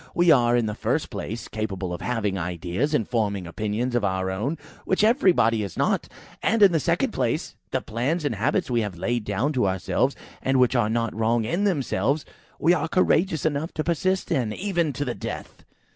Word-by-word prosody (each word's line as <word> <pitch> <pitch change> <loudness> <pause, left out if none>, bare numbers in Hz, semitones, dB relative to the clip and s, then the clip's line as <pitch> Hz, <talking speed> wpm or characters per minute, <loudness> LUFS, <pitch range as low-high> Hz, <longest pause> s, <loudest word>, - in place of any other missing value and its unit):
We 175 -1 +5
are, 120 -2 +4
in 120 - +1
the 105 - -2
first - - -1
place, 115 +2 -5
capable 100 -4 -3
of 85 - -6
having 110 -5 -1
ideas, 90 - -1
and 110 - 0
forming 105 -6 -1
opinions 110 +7 -2
of 120 -3 +1
our 95 -1 0
own, 120 +12 -2 0.3
which 190 +2 +1
everybody 180 - +4
is 100 - -5
not; - - +1 0.3
and, 225 -1 +3
in 195 - +8
the 165 - +2
second - - +1
place, - - -1
the - - -1
plans 135 +9 -2
and 145 - +1
habits 105 +1 0
we 120 -1 +2
have 105 -5 -4
laid 115 +5 -1
down 110 +9 0
to 125 -7 +2
ourselves, 95 +8 0 0.3
and 135 0 +2
which 125 +1 +3
are 115 -3 +2
not 115 0 0
wrong 115 +1 +1
in 175 - 0
themselves, 145 -4 0 0.3
we 170 - +4
are 180 - 0
courageous 175 -1 +2
enough 155 +2 -1
to 155 - -1
persist 185 +3 0
in, 125 -9 +1
even 175 - 0
to 145 +3 -3
the 125 - -2
death." - - -7
120 Hz, 200 wpm, -25 LUFS, 105-155 Hz, 0.3 s, in